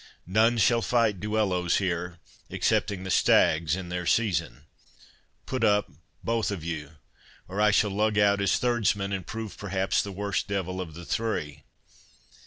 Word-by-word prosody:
None 110 Hz, +6 st, +3 dB
shall 115 Hz, +2 st, +3 dB
fight 110 Hz, -1 st, +1 dB
duellos 100 Hz, -4 st, 0 dB
here, 90 Hz, -2 st, -2 dB, 0.3 s
excepting 95 Hz, -2 st, 0 dB
the 95 Hz, -, -4 dB
stags 80 Hz, -1 st, +3 dB
in 95 Hz, -2 st, -6 dB
their 90 Hz, -1 st, -3 dB
season. 95 Hz, -, 0 dB, 0.8 s
Put 130 Hz, -3 st, -3 dB
up, 105 Hz, -1 st, +2 dB, 0.3 s
both 115 Hz, -1 st, 0 dB
of 100 Hz, -6 st, -4 dB
you, 80 Hz, -2 st, -5 dB, 0.5 s
or 95 Hz, +3 st, -3 dB
I 105 Hz, -, +5 dB
shall 105 Hz, 0 st, +2 dB
lug 105 Hz, +1 st, 0 dB
out 100 Hz, -1 st, +3 dB
as 100 Hz, -2 st, +2 dB
thirdsman, 105 Hz, -5 st, 0 dB
and 95 Hz, -3 st, -4 dB
prove 110 Hz, -2 st, -6 dB
perhaps 95 Hz, -1 st, 0 dB
the 100 Hz, -, -6 dB
worst 100 Hz, +1 st, -2 dB
devil 95 Hz, -2 st, -3 dB
of 80 Hz, -4 st, -8 dB
the 85 Hz, +1 st, -9 dB
three! 75 Hz, -11 st, -3 dB
100 Hz, 155 wpm, -27 LUFS, 90-105 Hz, 0.8 s, I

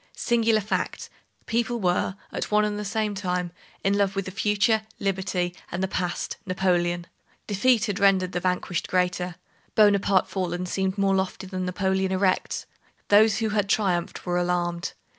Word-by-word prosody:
Singular 230 Hz, -2 st, +2 dB
fact! 210 Hz, -, -3 dB, 0.3 s
people 235 Hz, +1 st, 0 dB
were, 180 Hz, 0 st, +1 dB, 0.2 s
at -, -, -3 dB
one 210 Hz, 0 st, +3 dB
and 210 Hz, 0 st, -2 dB
the -, -, -3 dB
same 210 Hz, +1 st, -1 dB
time, 180 Hz, -3 st, -2 dB, 0.3 s
in 195 Hz, +1 st, +2 dB
love 200 Hz, -1 st, +1 dB
with 195 Hz, -1 st, -1 dB
the 185 Hz, -, -5 dB
future, 210 Hz, +2 st, +2 dB, 0.2 s
Liberty, 185 Hz, -3 st, -1 dB, 0.2 s
and 175 Hz, +2 st, -2 dB
the -, -, +1 dB
past, 180 Hz, -2 st, -3 dB
Napoleon. 175 Hz, -2 st, 0 dB, 0.4 s
Defeat 220 Hz, +3 st, +3 dB
had 205 Hz, -1 st, -2 dB
rendered 190 Hz, -2 st, +3 dB
the 180 Hz, -, -1 dB
vanquished 180 Hz, -1 st, -1 dB
greater. 180 Hz, -1 st, 0 dB, 0.4 s
Bonaparte 200 Hz, -3 st, +4 dB
fallen 180 Hz, -1 st, -2 dB
seemed 190 Hz, +1 st, -1 dB
more 195 Hz, -1 st, +2 dB
lofty 190 Hz, 0 st, -1 dB
than 185 Hz, -1 st, -4 dB
Napoleon 190 Hz, +1 st, 0 dB
erect. 185 Hz, 0 st, 0 dB, 0.4 s
Those 210 Hz, +1 st, +6 dB
who 225 Hz, -2 st, 0 dB
had 205 Hz, -1 st, 0 dB
triumphed 185 Hz, -5 st, 0 dB
were 175 Hz, -1 st, +1 dB
alarmed. 175 Hz, 0 st, -1 dB
190 Hz, 160 wpm, -25 LUFS, 180-205 Hz, 0.4 s, Those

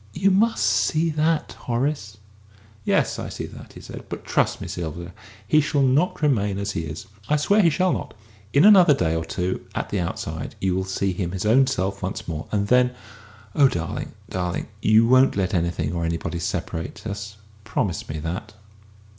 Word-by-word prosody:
You 195 Hz, +3 st, +2 dB
must 220 Hz, +4 st, +3 dB
see 160 Hz, +1 st, +2 dB
that, 155 Hz, +1 st, +1 dB
Horace!" 120 Hz, -4 st, -2 dB, 0.7 s
"Yes, -, -, +1 dB
I -, -, -4 dB
see -, -, -5 dB
that," -, -, -12 dB
he -, -, -11 dB
said; -, -, -9 dB
"but -, -, -6 dB
trust -, -, +1 dB
me, -, -, -6 dB
Sylvia, 85 Hz, +1 st, -5 dB, 0.3 s
he 155 Hz, -, +5 dB
shall 145 Hz, -1 st, +1 dB
not 145 Hz, +6 st, +2 dB
remain 105 Hz, -9 st, +2 dB
as 100 Hz, +1 st, -2 dB
he 80 Hz, -, -2 dB
is. 75 Hz, +1 st, -7 dB, 0.2 s
I 150 Hz, -, +4 dB
swear 200 Hz, +8 st, +3 dB
he 170 Hz, -, +5 dB
shall 185 Hz, +4 st, +1 dB
not. -, -, -5 dB, 0.4 s
In 140 Hz, +6 st, +5 dB
another 185 Hz, -8 st, +8 dB
day 80 Hz, -6 st, 0 dB
or 80 Hz, -, -1 dB
two, 90 Hz, +2 st, -3 dB
at -, -, -3 dB
the 100 Hz, -, 0 dB
outside, 85 Hz, -, -4 dB
you 95 Hz, -1 st, 0 dB
will 95 Hz, 0 st, -1 dB
see 95 Hz, 0 st, -1 dB
him 90 Hz, -1 st, -3 dB
his 95 Hz, +1 st, -3 dB
own 130 Hz, +5 st, +5 dB
self 100 Hz, -7 st, -2 dB
once 95 Hz, +1 st, -4 dB
more. 80 Hz, -2 st, -4 dB
And 100 Hz, -1 st, 0 dB
then 125 Hz, +1 st, +3 dB, 0.6 s
oh, 140 Hz, -, +6 dB
darling, 85 Hz, -8 st, -4 dB
darling, 90 Hz, -1 st, -3 dB
you 110 Hz, +2 st, +5 dB
won't 130 Hz, -1 st, +5 dB
let 95 Hz, -2 st, 0 dB
anything 85 Hz, -3 st, 0 dB
or 85 Hz, -1 st, -2 dB
anybody 85 Hz, +1 st, -2 dB
separate 85 Hz, -1 st, -4 dB
us? 100 Hz, 0 st, -6 dB, 0.3 s
Promise 100 Hz, -5 st, -2 dB
me 75 Hz, -, -3 dB
that!" 95 Hz, +7 st, -5 dB
100 Hz, 190 wpm, -23 LUFS, 90-140 Hz, 0.7 s, another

